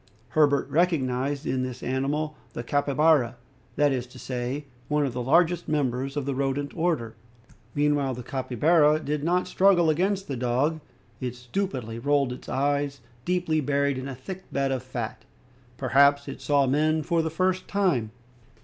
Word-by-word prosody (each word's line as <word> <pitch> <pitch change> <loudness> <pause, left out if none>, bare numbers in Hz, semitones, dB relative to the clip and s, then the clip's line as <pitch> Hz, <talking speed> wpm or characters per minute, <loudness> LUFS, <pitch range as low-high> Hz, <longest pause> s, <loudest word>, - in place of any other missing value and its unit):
Herbert 145 -3 +3
recognized 145 -4 +1
in 130 - 0
this 130 -1 -5
animal 145 +4 -1 0.2
the 120 - -5
capybara, 145 -1 +2 0.4
that 145 -1 +3
is 125 -2 -2
to 125 - -15
say, 125 +3 -4 0.2
one 150 -1 +1
of 130 - -3
the 125 - -3
largest 170 +6 +3
members 135 -2 -1
of 145 - -1
the 140 - -1
rodent 140 +1 -2
order. 160 -10 0 0.6
Meanwhile, 145 -3 +1
the 125 - -7
capybara 150 +5 +2
did 150 0 -2
not 180 +3 +1
struggle 180 -4 +4
against 190 +4 0
the 140 - -3
dog. 130 +6 0 0.4
It 125 -2 -4
stupidly 125 - -4
rolled 140 -1 +1
its - - -10
eyes, 140 0 0 0.2
deeply 175 -3 +1
buried 140 -1 0
in 130 - -5
a 135 - -5
thick 185 +9 -9
bed 135 -1 0
of 130 -2 -1
fat. 120 -4 -5 0.5
Perhaps 140 +2 +4
it 135 - -7
saw 145 -2 +3
men 155 +4 +2
for 170 +1 +1
the 160 - -1
first 185 +3 0
time. 180 - +1
140 Hz, 160 wpm, -26 LUFS, 130-155 Hz, 0.6 s, struggle